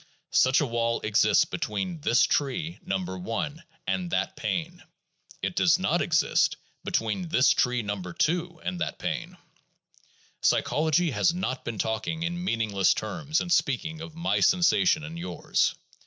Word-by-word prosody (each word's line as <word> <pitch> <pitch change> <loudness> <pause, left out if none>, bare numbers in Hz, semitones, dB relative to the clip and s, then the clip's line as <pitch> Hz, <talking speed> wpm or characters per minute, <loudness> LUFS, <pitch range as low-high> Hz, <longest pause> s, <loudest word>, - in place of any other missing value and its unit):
Such 130 +1 +5
a - - +2
wall 115 -1 0
exists 105 -1 +3
between 165 - -3
"this 120 -3 +4
tree" 155 +4 -1
No. 95 - -1
1 105 - -4 0.2
and 180 -2 -1
that - - -1
pain; 175 0 -3 0.6
it - - -2
does - - +4
not - - +1
exist - - +2 0.3
between 115 - -1
"this 130 -4 +4
tree" 125 -2 +1
No. 100 -1 -3
2 165 - -1
and 180 -1 -3
that - - -2
pain. - - -4 1.0
Psychology 160 +2 +2
has 170 +6 +2
not 130 -8 -3
been 115 -2 -5
talking 110 - -2
in 175 +1 -3
meaningless 110 - +1
terms 145 +9 -2
in 175 - -4
speaking 160 +2 0
of 165 -1 -9
my 170 +1 0
sensation 185 -2 +3
and 160 +1 -7
yours. 175 - 0
155 Hz, 145 wpm, -27 LUFS, 115-170 Hz, 1.0 s, Such